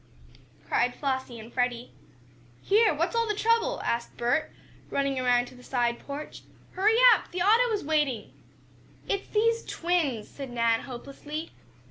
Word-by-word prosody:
cried 245 0 +1
Flossie 260 -4 -3
and 225 +2 -12
Freddie. 245 -1 -1 0.7
"Here! 430 +2 +4
What's 335 +8 -1
all 460 0 +2
the 420 - 0
trouble?" 460 +3 +1
asked 235 0 -2
Bert, 245 +6 0 0.4
running 275 -1 0
around 245 -1 +3
to - - -16
the 250 - -15
side 240 -2 -1
porch. 285 +2 -8 0.3
"Hurry 425 +4 +3 0.2
up! - - -2
The 355 0 -2
auto 455 +4 +4
is 420 -2 -1
waiting." 290 -8 0 0.7
"It's 395 - -2
these 460 +2 +1
twins!" 320 -11 -1
said 275 -2 -8
Nan, 230 -1 +2
hopelessly. 280 +5 -7
280 Hz, 145 wpm, -27 LUFS, 245-395 Hz, 0.7 s, Here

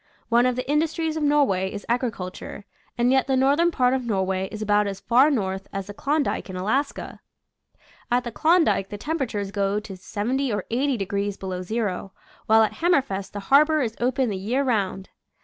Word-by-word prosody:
One 240 +1 +4
of 250 - 0
the 255 - -4
indus 300 +2 +1
tries 320 -1 -1
of 315 - -2
Norway 275 -11 +2
is 205 - -7
agriculture, 220 -5 -3 0.3
and 240 +1 +3
yet 265 0 +3
the 265 -1 +2
northern 285 +6 +3
part 255 -6 +2
of 265 -1 -1
Norway 190 -4 -1
is 215 - -6
about 210 -1 +2
as 195 -1 -5
far 255 +8 +4
north 195 -8 -2
as 195 -1 -4
the 205 - -8
Klondike 285 0 -1
in 185 - -6
Alaska. 220 +10 -2 0.9
At 245 +1 +2
the 240 - -5
Klondike 315 - +2
the 205 - -6
temperature 250 -6 -2
goes 200 +1 -1
to 195 -3 -8
70 240 +8 -2
or 205 - -2
80 265 +2 +1
degrees 200 0 -2
be - - -9
low 185 -1 -3
zero, 195 -1 -3 0.3
while 220 0 +6
at 215 - 0
Hammerfest 260 - +1
the 205 - -5
harbor 305 +2 +5
is 225 -2 -3
open 255 0 +1
the 195 - -3
year 235 +9 -1
round. 195 -6 -1
230 Hz, 195 wpm, -24 LUFS, 195-270 Hz, 0.9 s, while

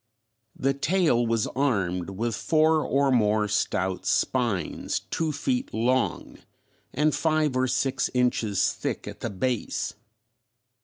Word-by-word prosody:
The 135 +1 +1
tail 140 -5 +2
was 115 -1 +1
armed 95 -10 0
with 115 +5 -2
four 155 - +2
or 140 0 +2
more 105 -3 +2
stout 95 -2 -1
spines 120 -8 0
two 160 -1 0
feet 250 - -2
long 125 +3 0 0.5
and 150 +2 +1
five 155 -4 +1
or 130 0 +2
six 135 +1 0
inches 120 -5 +1
thick - - -4
at - - -8
the - - -3
base. 120 +4 -2
125 Hz, 120 wpm, -26 LUFS, 110-145 Hz, 0.5 s, tail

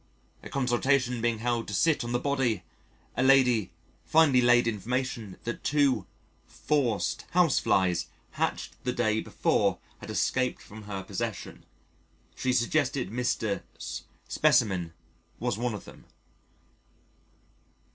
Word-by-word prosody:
A - - -10
consultation 125 -1 +1
being 120 -1 +1
held 120 +1 -1
to 105 - -3
sit 160 - +2
on 120 - -4
the 120 - +2
body, 125 -7 0 0.5
a - - 0
lady 130 -6 +4 0.3
finally 150 -6 +4
laid 120 0 +5
information 115 -2 -3
that 120 - -5
two 135 -8 +2 0.4
"forced 130 -8 -1
Houseflies" 95 - +3 0.2
hatched - - -3
the 125 - -1
day 110 -3 +1
before - - +1 0.2
had - - -10
escaped 130 -1 0
from 110 0 -12
her 100 -2 -5
possession. 105 +2 -5 0.7
She 130 - 0
suggested 125 -2 +1
Mr. 115 -3 -1 0.2
's - - -5 0.3
specimen 90 -5 +2 0.5
was 120 -2 -1
one 120 -2 -1
of 105 - -9
them. - - -14
120 Hz, 120 wpm, -28 LUFS, 110-130 Hz, 0.7 s, laid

